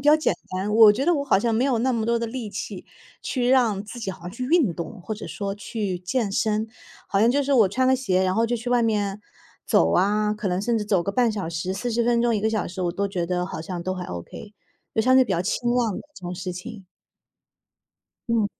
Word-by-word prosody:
较 295 +2 +6
简 310 - +1 0.2
单， 195 +3 -2
我 220 -2 +8
觉 250 +6 -2
得 350 - +4
我 285 -2 -1
好 260 - +3
像 230 +2 0
没 235 +4 +2
有 265 -4 +1
那 255 +3 +1
么 230 -2 -1
多 235 +1 +1
的 230 - -2
力 230 -2 -5
气 - - -6 0.4
去 245 -2 -1
让 235 -7 +3
自 230 +3 -9
己 195 -4 -3
好 175 - -11
像 175 - -6
去 235 +6 -5
运 285 - +3
动， 175 +4 -7
或 215 +5 -4
者 210 - -8
说 200 -1 -4
去 205 -3 -4
健 200 +4 -1
身。 215 +2 0 0.4
好 195 - +1
像 230 +3 +5
就 285 +3 +2
是 280 +1 0
我 225 -7 +5
穿 255 +7 +1
了 260 - +4
鞋， 190 -8 +1
然 185 0 +1
后 225 - +2
就 235 +1 0
去 240 +2 -6
外 245 -1 +3
面 205 -3 0 0.4
走 80 0 +3
啊， 210 +2 +2
可 210 -2 -3
能 180 +1 0
甚 235 +2 0
至 210 - -1
走 195 -4 +1
个 200 - -2
半 240 -1 +2
小 200 -6 -4
时、 170 +3 -3
40 235 +3 -1
分 235 0 +2
钟、 235 -2 +2
1 - - -1
个 220 - +2
小 215 -3 -1
时 185 +1 -5
我 175 -1 0
都 200 +2 -1
觉 180 -3 -2
得 180 0 -1
好 160 - -6
像 175 0 -5
都 185 +2 -2
还 180 -1 -5
okay， 90 - -8 0.4
就 220 - +3
相 255 +4 +4
对 260 - +6
比 200 - -2
较 170 - +1
轻 240 +6 -1
量 235 -5 +1
的 - - -6
这 - - -13
种 180 - -4
事 180 0 -5
情。 195 +2 -9 1.4
嗯。 230 -3 +2
215 Hz, 280 characters per minute, -24 LUFS, 190-240 Hz, 1.4 s, 我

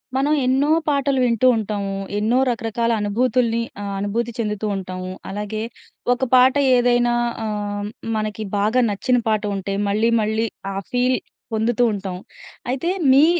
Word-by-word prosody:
మనం 280 +3 +2
ఎన్నో 270 +3 +2 0.2
పాటలు 280 -2 +1
వింటూ 245 +1 +3
ఉంటాము. 200 -2 -3 0.2
ఎన్నో 220 +4 +2
రకరకాల 230 0 -1
అనుభూతుల్ని 235 +2 +1 0.2
ఆహ్, 200 - -4
అనుభూతి 225 +4 -1
చెందుతూ 210 -1 -2
ఉంటాము. 185 -1 -5 0.2
అలాగే, 210 +2 -4 0.5
ఒక 250 - -4
పాట 255 +1 +6 0.2
ఏదైనా 240 0 +3 0.3
ఆహ్, 205 -1 -3
హ్మ్ 205 - -4 0.3
మనకి 215 0 -3
బాగా 215 +5 +2
నచ్చిన 245 +5 +1
పాట 215 -1 +1
ఉంటే, 195 0 -3
మళ్ళీ 215 +3 +2
మళ్ళీ 220 +1 0 0.3
ఆ - - -6 0.2
ఫీల్ 250 +1 +2 0.4
పొందుతూ 230 +2 +1
ఉంటాం. 195 -2 -4 0.5
అయితే, 270 +7 -1 0.2
మీ, 280 +3 +7
220 Hz, 140 wpm, -21 LUFS, 205-250 Hz, 0.5 s, మీ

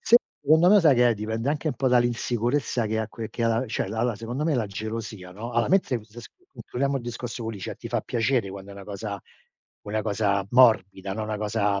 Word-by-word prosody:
Secondo 160 - +4
me 210 -1 +7
sai 150 -5 +6
che 120 0 +5
è - - +1
dipende 110 +4 -3
anche 155 +1 -1
un - - -2
po' 135 - +1
dall'insicurezza 120 0 +1
che 110 +1 -1
ha 110 0 -2
que 115 0 -6
che 115 - -4
ha - - +3
la 115 +3 +1
cioè 110 - -2
la 110 +3 -2
la 120 -2 +1
secondo 120 +7 -4
me 160 - +1
la 120 -5 0
gelosia 110 -2 -6
no? 115 +5 -7
Allora 120 0 +1
mentre 185 -10 +2
m - - -14
s 110 +2 -12 0.2
concludiamo 140 +2 -2
il 130 - -4
discorso 120 0 -5
co 115 - -2
Licia, 100 -4 -6
ti 115 - -9
fa 120 -1 0
piacere 120 -2 0
quando 100 0 -9
è - - -10
una 100 0 -10
cosa 100 0 -5 0.6
una 105 +1 -2
cosa 100 -2 0
morbida, 100 -6 +4
no, 110 - -3
una 105 0 -3
cosa 105 -1 0
115 Hz, 235 wpm, -25 LUFS, 105-125 Hz, 0.6 s, me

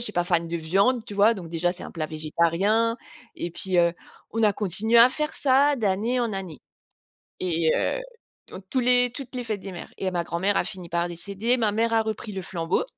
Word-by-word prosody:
suis 225 -3 +1
pas 175 0 0
fan 170 -2 +1
de 170 - -2
viande, 200 +9 +1
tu 210 -3 -9
vois, 210 +3 +4
donc 180 -5 -8
déjà, 170 +1 0
c'est 180 - -9
un - - -9
plat 155 -2 -3
végétarien. 170 +9 +1 0.4
Et 170 -1 -4
puis, 185 -1 -1
heu, 170 -1 +4 0.4
on 225 0 -1
a 210 -2 +4
continué 210 +4 +2
à 235 +2 +9
faire 300 +3 -3
ça 280 +1 +3
d'année 220 +3 0
en 235 -3 -1
année 185 -7 -5 0.8
et 170 -3 0
heu, - - 0 0.5
donc 190 - -10
tous 260 - +1
les 245 0 +4
toutes 260 0 -8
les 250 - -3
fêtes 215 -3 -3
des 195 - -7
mères. 175 - -9
Et 190 - -1
ma 175 -2 -2
grand-mère 180 +4 0
a - - +2
fini 180 -3 -7
par 170 0 0
décéder, 200 +8 0
ma 220 -4 +1
mère 230 +2 0
a 225 - +4
repris 220 0 -5
le 190 - -5
flambeau. 175 - -1
200 Hz, 220 wpm, -25 LUFS, 175-230 Hz, 0.8 s, à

